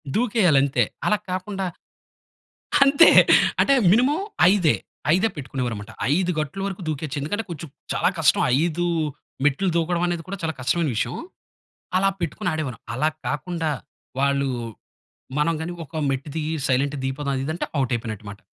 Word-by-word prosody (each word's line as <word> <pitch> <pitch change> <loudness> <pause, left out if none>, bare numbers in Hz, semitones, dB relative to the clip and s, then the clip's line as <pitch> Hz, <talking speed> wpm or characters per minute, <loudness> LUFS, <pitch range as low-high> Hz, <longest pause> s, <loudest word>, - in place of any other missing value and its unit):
దూకేయాలంతే. 180 - +3 0.2
అలా 210 - +3
కాకుండా, 190 +1 -3 1.2
అంతే. 280 +4 +7 0.5
అంటే 275 - +5 0.2
మినిమమ్ 275 - +3 0.3
ఐదే. 180 -7 +3 0.4
ఐదే 190 +5 +3
పెట్టుకునేవారు 130 -4 -3
మాట. 105 +2 -10 0.2
5 180 +1 +1
గట్లు 155 +6 -3
వరకు 195 -1 -5
దూకేయచ్చు. 150 -1 -3
ఎందుకంటే, 205 +10 -2
కొంచెం 165 -1 -6 0.3
చాలా - - +2
కష్టం. 160 - +4 0.2
5 175 +1 0 0.6
మెట్లు 145 +7 +2
దూకడం 170 +1 +1
అనేది 175 -1 -2
కూడా, 200 +1 -5
చాలా 160 -1 -1
కష్టమైన 150 +4 +1
విషయం. - - -1 0.8
అలా 195 +1 +3
పెట్టుకొని 170 +2 -2
ఆడేవాళ్ళం. 150 -7 -4
అలా 150 +6 +2 0.2
కాకుండా, 160 +3 -2 0.5
వాళ్ళు 140 0 +2 0.9
మనం 150 +3 +2
గాని 175 +2 -4
ఒక 155 +2 -6
మెట్టు 135 +2 -3
దిగి, 155 0 -2 0.2
సైలెంట్‌గా 140 +2 +1
దిగిపోదాం 135 +1 -2
అది 130 - -2
ఇది 155 - -2
అంటే, 170 - -2 0.2
ఔట్ 130 -1 -1
అయిపోయినట్టుమాట. 105 -3 -6
155 Hz, 145 wpm, -23 LUFS, 140-185 Hz, 1.2 s, అంతే